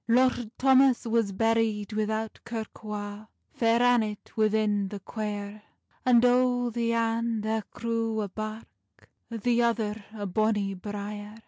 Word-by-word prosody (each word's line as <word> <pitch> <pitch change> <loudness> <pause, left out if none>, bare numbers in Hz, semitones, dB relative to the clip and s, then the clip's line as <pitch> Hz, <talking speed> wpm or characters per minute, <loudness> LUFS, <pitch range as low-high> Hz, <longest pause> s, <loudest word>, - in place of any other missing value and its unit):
Lord 245 -1 +3
Thomas 265 -2 +4
was 230 -3 +1
buried 225 0 +1
without 220 +1 -2
kirk 225 -1 -6
wa, 210 0 -6 0.3
Fair 230 +1 +3
Annet 225 -4 +1
within 215 -2 +2
the 205 +1 -6
quiere, 205 0 -5 0.4
And 245 -1 +5
o 245 -1 +3
the 230 0 0
ane 230 -1 0
thair 220 0 0
grew 230 -1 -2
a 205 - -2
birk, 215 +3 -9 0.2
The 235 +1 +1
other 220 -3 0
a 210 -2 -5
bonny 205 0 +1
briere. 205 +2 -6
220 Hz, 130 wpm, -28 LUFS, 210-230 Hz, 0.4 s, And